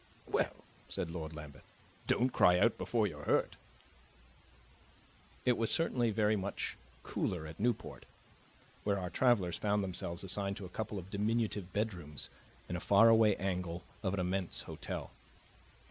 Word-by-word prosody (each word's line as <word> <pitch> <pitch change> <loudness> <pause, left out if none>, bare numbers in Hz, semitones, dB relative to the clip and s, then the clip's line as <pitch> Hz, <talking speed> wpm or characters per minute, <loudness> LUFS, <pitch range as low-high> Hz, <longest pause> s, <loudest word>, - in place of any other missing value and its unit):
"Well," - - 0 0.3
said 80 - -3
Lord 80 -2 -5
Lambeth, 75 -3 -10 0.4
"don't 125 +2 +3
cry 90 0 +6
out 115 +6 +4
before 115 -3 +1
you're 75 -7 -5
hurt!" - - +2 1.9
It 125 -1 +4
was 115 - +1
certainly 125 -8 +2
very 110 0 +3
much 100 0 -3 0.3
cooler 85 -4 -2
at 80 - -9
Newport, 120 +1 -1 0.8
where 100 -1 +1
our 90 -1 -3
travelers 105 -9 +3
found 105 -1 +2
themselves 85 -1 -4
assigned 100 +1 -2
to 100 - -6
a - - -8
couple 105 +2 -4
of 95 0 -7
diminutive 105 -2 0
bedrooms 90 -8 -3 0.4
in 90 - -3
a - - -1
faraway 110 +2 +6
angle 90 -2 -2 0.2
of 100 -2 0
an - - -2
immense 90 0 -1
hotel. - - -5
100 Hz, 145 wpm, -34 LUFS, 90-110 Hz, 1.9 s, cry